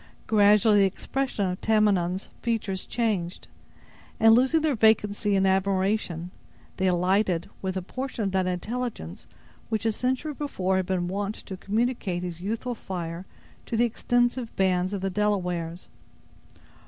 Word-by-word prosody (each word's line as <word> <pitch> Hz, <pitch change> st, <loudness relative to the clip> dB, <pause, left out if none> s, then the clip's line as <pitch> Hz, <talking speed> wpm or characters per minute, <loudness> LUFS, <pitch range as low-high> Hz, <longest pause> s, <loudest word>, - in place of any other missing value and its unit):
Gradually 210 Hz, 0 st, +5 dB
the 195 Hz, -, +6 dB
expression 220 Hz, +3 st, -2 dB
of 180 Hz, 0 st, -4 dB
Tamenund's 195 Hz, -4 st, +2 dB
features 210 Hz, -5 st, -2 dB
changed, 205 Hz, -7 st, -2 dB, 0.7 s
and 225 Hz, 0 st, +7 dB
losing 265 Hz, +7 st, +4 dB
their 310 Hz, -2 st, +2 dB
vacancy 210 Hz, -2 st, +3 dB
in 195 Hz, 0 st, +3 dB
admiration, 190 Hz, -2 st, 0 dB, 0.5 s
they 190 Hz, 0 st, +2 dB
lighted 180 Hz, 0 st, +1 dB
with 190 Hz, 0 st, -2 dB
a 185 Hz, -, -3 dB
portion 255 Hz, +3 st, -4 dB
of 195 Hz, -, -1 dB
that 190 Hz, -1 st, +1 dB
intelligence 195 Hz, -, -4 dB, 0.4 s
which 220 Hz, -1 st, -1 dB
a 225 Hz, -, +3 dB
century 260 Hz, +7 st, -1 dB
before 190 Hz, -11 st, -1 dB
had 185 Hz, -1 st, -1 dB
been 180 Hz, -2 st, 0 dB
wont 200 Hz, +3 st, -2 dB
to 190 Hz, -, -8 dB
communicate 205 Hz, -2 st, -1 dB
his 175 Hz, -1 st, -6 dB
youthful 225 Hz, +5 st, -3 dB
fire 175 Hz, -4 st, -6 dB, 0.4 s
to 230 Hz, -, -2 dB
the 240 Hz, -, +4 dB
extensive 240 Hz, +1 st, 0 dB
bands 185 Hz, -1 st, +1 dB
of 200 Hz, -2 st, -3 dB
the 195 Hz, 0 st, -1 dB
Delawares. 180 Hz, -4 st, -1 dB
200 Hz, 140 wpm, -26 LUFS, 185-225 Hz, 0.7 s, and